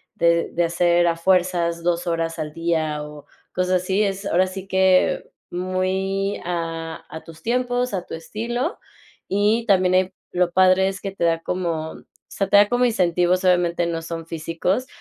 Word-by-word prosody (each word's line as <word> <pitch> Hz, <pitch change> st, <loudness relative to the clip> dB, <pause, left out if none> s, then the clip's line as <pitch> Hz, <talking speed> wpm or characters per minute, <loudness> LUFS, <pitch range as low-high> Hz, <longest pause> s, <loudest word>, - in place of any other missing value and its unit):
de 170 Hz, 0 st, +2 dB
de 175 Hz, -, +1 dB
hacer 175 Hz, +1 st, +2 dB
a 170 Hz, -, +2 dB
fuerzas 175 Hz, -1 st, +1 dB
2 175 Hz, 0 st, 0 dB
horas 165 Hz, 0 st, -1 dB
al 155 Hz, -1 st, -3 dB
día 160 Hz, -2 st, -1 dB
o 150 Hz, -1 st, -10 dB, 0.3 s
cosas 185 Hz, 0 st, +1 dB
así. 190 Hz, +3 st, 0 dB
Es 195 Hz, 0 st, -2 dB
ahora 185 Hz, -1 st, +2 dB
sí 190 Hz, +1 st, -7 dB
que, 190 Hz, -1 st, +2 dB, 0.2 s
muy 190 Hz, +2 st, -1 dB
a, 165 Hz, -2 st, -4 dB
a 160 Hz, -, -8 dB
tus 165 Hz, -1 st, -13 dB
tiempos, 245 Hz, 0 st, 0 dB
a 185 Hz, -, -2 dB
tu -, -, -6 dB
estilo. 235 Hz, -, -3 dB, 0.5 s
Y 210 Hz, +4 st, +1 dB
también 185 Hz, -3 st, +3 dB
ahí 185 Hz, 0 st, +2 dB, 0.2 s
lo 180 Hz, -1 st, +1 dB
padre 185 Hz, +1 st, +4 dB
es 195 Hz, -1 st, -4 dB
que 195 Hz, -, -4 dB
te 195 Hz, -, -5 dB
da 165 Hz, -1 st, +2 dB
como, 165 Hz, -3 st, -2 dB
o -, -, -14 dB, 0.2 s
sea, 195 Hz, -, -2 dB
te -, -, +5 dB
da 205 Hz, -, +9 dB
te -, -, -3 dB
da -, -, -16 dB
como 245 Hz, +1 st, +2 dB
incentivos, 180 Hz, -4 st, +2 dB
obviamente 175 Hz, -1 st, +2 dB
no 165 Hz, -1 st, -2 dB
son 165 Hz, 0 st, -6 dB
físicos, 165 Hz, -, -2 dB
180 Hz, 185 wpm, -22 LUFS, 170-195 Hz, 0.5 s, da